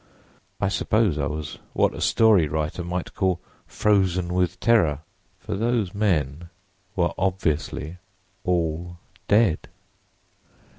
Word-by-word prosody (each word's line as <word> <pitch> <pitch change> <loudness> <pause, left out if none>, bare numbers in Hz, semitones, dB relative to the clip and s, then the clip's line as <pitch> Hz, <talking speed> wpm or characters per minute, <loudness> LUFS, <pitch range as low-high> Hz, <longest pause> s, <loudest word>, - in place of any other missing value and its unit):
I - - +1
suppose 95 -2 +1
I 70 - 0
was 75 -1 -5
what - - +2
a - - -7
story 105 -8 +4
writer 75 +3 -2
might 90 +1 -4
call 95 -2 0 0.3
'frozen 95 -4 +1
with 90 -1 0
terror.' 85 -12 +3 0.4
For 105 +3 -6
those 115 -3 0
men 85 -6 0 0.5
were 85 -2 +1
obviously 85 -3 -1 0.5
all 85 -1 -1 0.3
dead! 105 -5 +3
90 Hz, 110 wpm, -24 LUFS, 80-100 Hz, 0.5 s, story